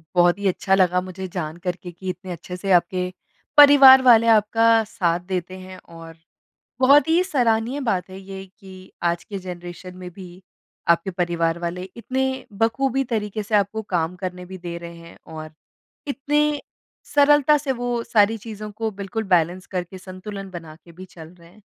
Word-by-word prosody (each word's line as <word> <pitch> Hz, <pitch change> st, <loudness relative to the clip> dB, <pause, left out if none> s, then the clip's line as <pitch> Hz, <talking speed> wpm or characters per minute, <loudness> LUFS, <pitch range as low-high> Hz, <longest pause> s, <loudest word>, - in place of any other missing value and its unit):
बहुत 175 Hz, +1 st, +4 dB
ही 200 Hz, -, -1 dB
अच्छा 190 Hz, +1 st, +1 dB
लगा 180 Hz, -1 st, +2 dB
मुझे 185 Hz, +1 st, -7 dB
जानकर 175 Hz, +1 st, -4 dB
के 175 Hz, -, -7 dB
कि 185 Hz, +2 st, -8 dB
इतने 185 Hz, +1 st, -6 dB
अच्छे 175 Hz, +1 st, -7 dB
से 195 Hz, +2 st, -3 dB
आपके 180 Hz, +1 st, +2 dB, 0.5 s
परिवार 280 Hz, -2 st, +9 dB
वाले 230 Hz, -3 st, +6 dB
आपका 225 Hz, +1 st, +4 dB
साथ 175 Hz, -5 st, -1 dB
देते 185 Hz, 0 st, -4 dB
हैं। 185 Hz, 0 st, -11 dB
और 165 Hz, -1 st, -13 dB, 0.6 s
बहुत 280 Hz, +4 st, +5 dB
ही 335 Hz, +3 st, +3 dB
सराहनीय 245 Hz, -, 0 dB
बात 190 Hz, -8 st, -1 dB
है 190 Hz, +1 st, -9 dB
ये 195 Hz, 0 st, -9 dB
कि 190 Hz, -1 st, -14 dB
आज 170 Hz, 0 st, 0 dB
के 200 Hz, -, -7 dB
ज़नरेशन 180 Hz, 0 st, -9 dB
में 180 Hz, -1 st, -8 dB
भी 180 Hz, 0 st, -12 dB, 0.5 s
आपके 170 Hz, +3 st, +2 dB
परिवार 170 Hz, -2 st, -1 dB
वाले 175 Hz, +1 st, -4 dB
इतने 260 Hz, +3 st, -2 dB, 0.3 s
बख़ूबी 265 Hz, +4 st, +1 dB
तरीके 215 Hz, -3 st, -3 dB
से 215 Hz, +1 st, -1 dB
आपको 205 Hz, +2 st, 0 dB
काम 165 Hz, +1 st, -1 dB
करने 180 Hz, -1 st, -6 dB
भी 190 Hz, +1 st, -9 dB
दे 175 Hz, -1 st, -7 dB
रहे 170 Hz, 0 st, -9 dB
हैं 170 Hz, 0 st, -14 dB, 0.2 s
और 155 Hz, 0 st, -8 dB, 0.6 s
इतने 295 Hz, +1 st, 0 dB, 0.5 s
सरलता 290 Hz, 0 st, +5 dB
से 280 Hz, -2 st, -2 dB
वो 245 Hz, -1 st, -3 dB
सारी 215 Hz, 0 st, +3 dB
चीज़ों 215 Hz, -1 st, -8 dB
को 220 Hz, +2 st, -3 dB
बिल्कुल 200 Hz, +2 st, -5 dB
बैलेंस, 180 Hz, -1 st, +1 dB
करके 185 Hz, 0 st, -5 dB
संतुलन 195 Hz, +1 st, -9 dB
बना 165 Hz, -3 st, -9 dB
के 170 Hz, -, -16 dB
भी 180 Hz, +3 st, -11 dB
चल 165 Hz, -3 st, -13 dB
रहे 170 Hz, -1 st, -18 dB
हैं। 205 Hz, +5 st, -21 dB
190 Hz, 175 wpm, -22 LUFS, 175-225 Hz, 0.6 s, परिवार